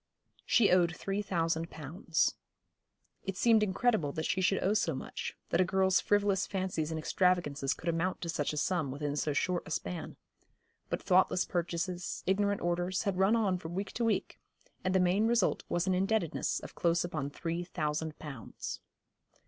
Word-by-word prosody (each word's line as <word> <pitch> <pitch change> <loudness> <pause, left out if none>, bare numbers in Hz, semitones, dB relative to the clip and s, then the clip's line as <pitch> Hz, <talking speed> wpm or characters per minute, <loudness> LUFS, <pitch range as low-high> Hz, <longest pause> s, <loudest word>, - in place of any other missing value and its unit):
She 220 -6 +5
owed 175 -1 +4
three 195 +1 -2
thousand 165 -4 -1
pounds. 160 +2 -1 0.9
It 195 -1 -4
seemed 225 0 +5
incredible 210 - +1
that 160 - -3
she 190 - 0
should 190 +1 +2
owe 195 - +3
so 190 -8 +1
much, - - -5
that 170 - +3
a - - +6
girl's 190 0 +3
frivolous 205 -2 +2
fancies 185 -5 -2
and 160 - -3
extravagances 155 -5 +1
could 170 - -10
amount 170 +2 0
to 170 - -4
such 145 -3 -1
a 150 - -5
sum 165 -2 0
within 145 +2 -3
so 150 0 0
short 175 +4 0
a - - -8
span. 165 +1 -4 0.7
But - - -2
thoughtless 185 -1 +3
purchases, 175 +1 -3
ignorant 200 +2 +1
orders, 175 +2 0
had 195 -3 -1
run 195 +4 +4
on 195 -5 +1
from 165 0 -7
week 195 +1 -3
to 235 - -2
week, 225 -1 0 0.4
and 185 0 0
the - - +5
main 185 +5 +3
result 235 0 +2
was 175 +1 0
an 190 - +2
indebtedness 190 -3 0
of - - -9
close 170 0 +1
upon 145 -5 -3
three 170 +4 -3
thousand 155 -2 -3
pounds. 135 -8 -7
180 Hz, 175 wpm, -32 LUFS, 165-195 Hz, 0.9 s, a